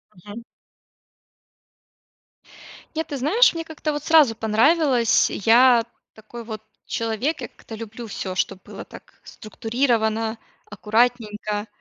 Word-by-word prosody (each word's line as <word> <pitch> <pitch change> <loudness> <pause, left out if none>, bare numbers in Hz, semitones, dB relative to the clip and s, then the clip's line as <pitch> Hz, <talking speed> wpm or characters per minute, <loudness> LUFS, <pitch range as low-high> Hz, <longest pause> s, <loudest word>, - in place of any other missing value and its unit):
Мгм. 205 +5 -10 2.5
Нет, 320 - -2
ты 285 - -5
знаешь, 365 - +4
мне, 330 - -4
как-то, 320 -1 -4
вот, 295 0 -5
сразу 305 -8 +5
понравилось, 240 +2 +3
я 235 +2 +4 0.3
такой, 225 +2 -10
вот, 220 -1 -8 0.2
человек, 230 +7 -2
я 245 - -5
как-то 225 - -12
люблю 225 +1 -8
всё, 190 -2 -5
чтобы 185 0 -2
было - - -9
так - - -16
структурировано, 225 -1 -2 0.3
аккуратненько, 215 -1 -1
230 Hz, 110 wpm, -22 LUFS, 215-265 Hz, 2.5 s, сразу